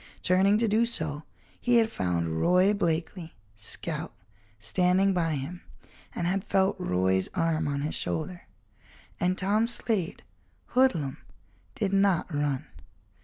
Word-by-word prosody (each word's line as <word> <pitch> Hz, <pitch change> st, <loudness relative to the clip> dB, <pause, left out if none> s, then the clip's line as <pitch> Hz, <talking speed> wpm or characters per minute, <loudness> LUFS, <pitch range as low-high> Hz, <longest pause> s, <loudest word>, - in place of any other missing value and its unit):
Turning 190 Hz, +3 st, +4 dB
to 230 Hz, +1 st, +1 dB
do 220 Hz, +2 st, +3 dB
so, 160 Hz, -11 st, -2 dB, 0.4 s
he 245 Hz, 0 st, +3 dB
had 225 Hz, -1 st, +3 dB
found 85 Hz, -, -1 dB
Roy 185 Hz, +3 st, +4 dB
Blakeley, 170 Hz, -2 st, -2 dB, 0.2 s
scout, 105 Hz, 0 st, -4 dB, 0.5 s
standing 180 Hz, -, +2 dB
by 165 Hz, -3 st, 0 dB
him, 150 Hz, +6 st, -6 dB, 0.5 s
and 170 Hz, -, -2 dB
had 190 Hz, +2 st, 0 dB
felt 195 Hz, 0 st, +2 dB
Roy's 95 Hz, -, +1 dB
arm 165 Hz, -3 st, +1 dB
on 140 Hz, -1 st, -1 dB
his 150 Hz, -, -2 dB
shoulder. 175 Hz, +3 st, -4 dB, 0.7 s
And 180 Hz, +1 st, +1 dB
Tom 210 Hz, +4 st, +2 dB
Slade, 220 Hz, -7 st, -2 dB, 0.5 s
hoodlum, 175 Hz, -, +2 dB, 0.6 s
did 200 Hz, -1 st, -1 dB
not 195 Hz, -4 st, +2 dB
run. 145 Hz, -2 st, -1 dB
180 Hz, 125 wpm, -28 LUFS, 145-195 Hz, 0.7 s, Turning